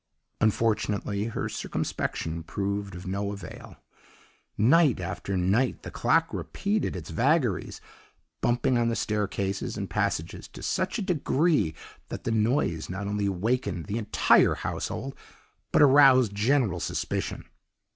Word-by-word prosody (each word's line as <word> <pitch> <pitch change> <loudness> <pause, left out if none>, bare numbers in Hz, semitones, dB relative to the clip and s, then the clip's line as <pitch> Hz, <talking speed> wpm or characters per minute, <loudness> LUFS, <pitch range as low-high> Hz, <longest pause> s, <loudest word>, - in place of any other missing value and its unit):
"Unfortunately, 105 -2 0
her 115 - -3
circumspection 80 +1 -3
proved 100 +2 -3
of 90 +2 -9
no 100 +2 -2
avail; 100 -4 -10 0.8
night 135 - +4
after 95 +1 -3
night 100 +8 +1
the - - -7
clock 165 +1 +1
repeated 205 - -2
its 80 -4 -7
vagaries, 125 - +1 0.6
bumping 120 +1 +2
on 115 0 +2
the 115 - -1
staircases 100 -3 -2
and - - -5
passages - - -2
to - - -12
such 185 +5 -1
a 215 - -2
degree 155 - +1 0.3
that - - -6
the - - -1
noise 110 - 0
not 95 +2 -4
only 100 0 -1
awakened 100 -2 -1
the 105 +3 -2
entire 105 - +4
household, 135 +5 -4 0.6
but - - +5
aroused 130 -5 +6
general 115 - +1
suspicion. - - -3
105 Hz, 125 wpm, -27 LUFS, 100-130 Hz, 0.8 s, aroused